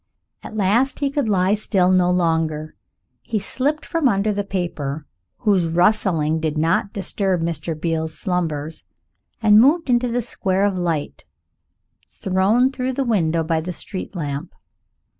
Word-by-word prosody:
At 220 - -9
last 215 +6 +2
he 280 -1 -1
could 280 -5 -1
lie 190 -1 +2
still 195 -3 +2
no 180 -1 +3
longer. 160 -3 0 0.5
He 220 - -3
slipped 270 +9 -1
from 330 -4 +1
under 205 0 +1
the 205 0 -2
paper, 160 -7 -4 0.3
whose 190 -5 +2
rustling 165 -3 +2
did 155 -1 -2
not 165 +5 +1
disturb 190 -3 -1
Mr. 165 -1 -3
Beale's 160 -1 -2
slumbers, 160 -4 -3 0.6
and 210 0 +7
moved 290 +2 +3
into 245 +1 +2
the 240 0 -1
square 195 -4 0
of 200 -2 0
light 165 - -3 0.8
thrown 200 +8 +1
through 260 -1 -3
the 275 +2 -1
window 165 -8 +1
by 160 0 0
the 180 +2 -5
street 190 +3 -7
lamp. 150 +1 -5
185 Hz, 145 wpm, -21 LUFS, 165-215 Hz, 0.8 s, and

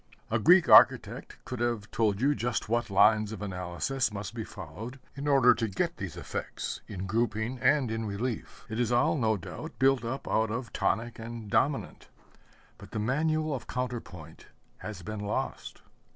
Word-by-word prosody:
A 115 - +2
Greek 175 - +6
architect - - +5
could 125 - -5
have 120 -4 -1
told 110 -2 +1
you 140 +3 +4
just 120 -4 -2
what 120 +1 0
lines 105 +2 +4
of 105 -2 -6
analysis 90 - -2
must 105 +1 -6
be 115 -1 -4
followed 105 - -8 0.2
in 140 +1 -5
order 135 -4 +6
to 115 -1 -2
get 95 -3 -2
these - - -6
effects - - -5
in 95 -2 -5
grouping 110 +3 -1
and 140 -5 +3
in 115 0 -2
relief. 110 +3 -4
It 110 +1 -4
is 120 -1 +1
all, 140 +7 +3
no 110 -6 +1
doubt, 90 - -8
built 135 -2 +3
up 130 +4 -4
out 110 0 +1
of 115 +2 -4
tonic 115 +4 -1
and 115 -2 -7
dominant 140 +1 0 0.7
but - - -12
the - - -2
manual 155 +6 0
of 130 - -5
counter 125 -1 -2
point 80 -3 -13 0.3
has 105 -4 -8
been 105 +3 -5
lost. 105 0 -4
115 Hz, 175 wpm, -29 LUFS, 105-125 Hz, 0.7 s, Greek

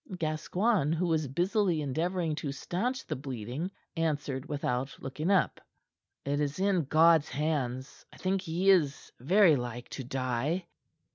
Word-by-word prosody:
Gascoigne, 160 +2 +1
who 175 +3 0
was 160 -3 +1
busily 180 - +1
endeavoring 160 +4 -1
to 145 -2 -3
stanch 220 - -2
the - - -3
bleeding, 130 - -4 0.3
answered 150 -5 -1
without 135 -2 -2
looking 150 +6 -3
up: 195 -2 +2 0.6
"It 140 +1 0
is 145 +3 -2
in 190 -5 +2
God's 160 +1 +5
hands. 140 -2 -2
I - - -15
think 190 0 0
he 180 +4 +2
is 150 -7 +1
very 175 - +5
like 120 -1 -5
to 135 - -6
die." 130 +7 -1
155 Hz, 140 wpm, -30 LUFS, 135-180 Hz, 0.6 s, God's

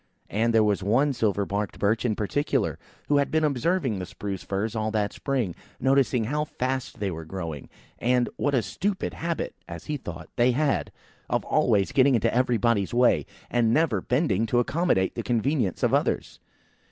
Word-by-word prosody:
And 115 +3 +2
there 110 -1 +4
was 105 -2 +1
one 125 +9 +2
silver 105 -4 0
barked 100 0 -3
Birch 110 +4 +1
in 110 -3 +1
particular, 135 +3 -1 0.3
who 145 - +3
had 140 - +2
been 160 0 +1
observing 140 - +1
the 90 - -5
spruce 100 -3 -5
firs 100 +3 -3
all 110 0 0
that 105 -2 -1
spring; 125 -10 -1 0.3
noticing 130 -2 +2
how 150 +7 -1
fast 130 -3 -3
they 100 -2 -1
were 80 -1 -6
growing, 80 -4 -6 0.3
and 125 0 +2
what 145 -1 0
a 120 - +2
stupid 190 - -2
habit 170 0 -3
(as 85 -1 -8
he 150 - -2
thought) 80 - -8
they 120 +1 +4
had, 145 +2 0 0.4
of - - 0
always 100 -2 +2
getting 135 0 +4
into 115 - +1
everybody's 120 -4 +1
way, 120 - +3 0.2
and 115 -1 +3
never 145 - +2
bending 115 - +1
to 120 - +1
accommodate 140 - +1
the - - -3
convenience 120 - 0
of - - +2
others. - - 0
120 Hz, 175 wpm, -26 LUFS, 100-135 Hz, 0.4 s, there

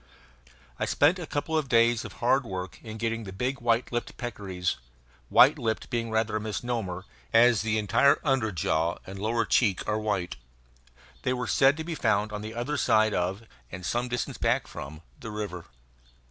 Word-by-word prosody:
I - - +1
spent 160 +6 +3
a 170 - -6
couple 155 +2 -2
of 155 -4 0
days 115 0 +4
of - - -8
hard 130 +3 +2
work 95 -5 -6
in 110 -1 -8
getting 115 0 -2
the 95 - -7
big 125 +8 -3
white 120 0 +1
lipped 120 0 -3
peccaries 95 -7 -3 0.5
white 145 +4 +6
lipped 110 -3 -2
being 115 -1 -1
rather 110 0 0
a - - -4
misnomer, 110 -4 -3 0.3
as 115 -1 +5
the 110 0 0
entire 110 +7 +4
under 135 -7 +1
jaw 80 0 0
and 95 +1 -8
lower 115 +3 0
cheek 100 -7 +2
are 105 0 0
white. 95 -11 -2 0.8
They 130 - 0
were 125 -1 -2
said 135 +7 +4
to 160 - -4
be 170 +1 -4
found 110 -6 +1
on 105 0 -5
the 110 +1 -7
other 130 +5 -2
side 110 -4 +3
of, 95 +5 -1 0.3
and 90 -1 -7
some 120 +5 -1
distance 125 0 -3
back - - +1
from, 80 +4 -9 0.2
the 115 - -7
river. 105 -5 -5
110 Hz, 185 wpm, -27 LUFS, 100-125 Hz, 0.8 s, white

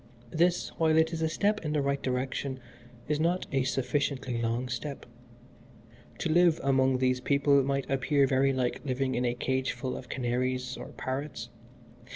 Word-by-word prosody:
This, 175 +4 +2
while 160 -1 +4
it 160 +1 +3
is 165 - -3
a 160 - +1
step 210 +5 0
in 150 -1 -2
the 150 - +1
right 140 0 0
direction, 130 +1 -2 0.5
is 150 0 0
not 175 +3 +1
a 135 -2 +2
sufficiently 130 -1 -1
long 115 +2 -1
step. 135 +3 -5 1.1
To - - -2
live 170 -1 +4
among 130 -1 +3
these 125 0 +1
people 140 +1 +3
might 140 0 -1
appear 135 +1 +2
very 135 0 +3
like 130 -2 -1
living 130 -1 -1
in 125 +1 0
a 120 0 0
cageful 130 +1 -2
of 125 - -9
canaries 125 0 -1
or - - -8
parrots. 130 -2 -4
135 Hz, 165 wpm, -29 LUFS, 130-150 Hz, 1.1 s, while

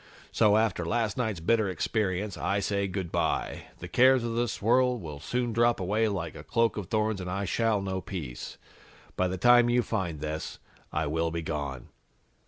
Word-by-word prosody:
So, 105 -2 +4
after 110 -5 +1
last 110 +3 0
night's 110 -8 -1
bitter 110 +4 +2
experience, 100 +1 -1
I 100 +5 0
say 100 0 0
good 95 -2 -4
by. - - -1
The - - -8
cares 130 0 +5
of 115 -1 -2
this 120 0 -1
world 125 +3 +3
will 75 -6 -7
soon 120 +8 -2
drop 120 +1 +3
away 105 +4 +1
like 90 -6 -3
a - - -10
cloak 115 -1 +1
of 105 -4 -5
thorns 110 -1 0
and 90 - -5
I 100 +2 -2
shall 110 0 +1
know 95 -1 -2
peace. 75 -12 -6 0.6
By 95 - +1
the 95 +1 -3
time 120 +4 +6
you 120 0 +3
find 90 -10 -2
this, 75 +1 -4 0.3
I 80 +1 -1
will 80 +3 0
be 85 0 -4
gone.'" 70 -5 -4
100 Hz, 190 wpm, -28 LUFS, 85-115 Hz, 0.6 s, time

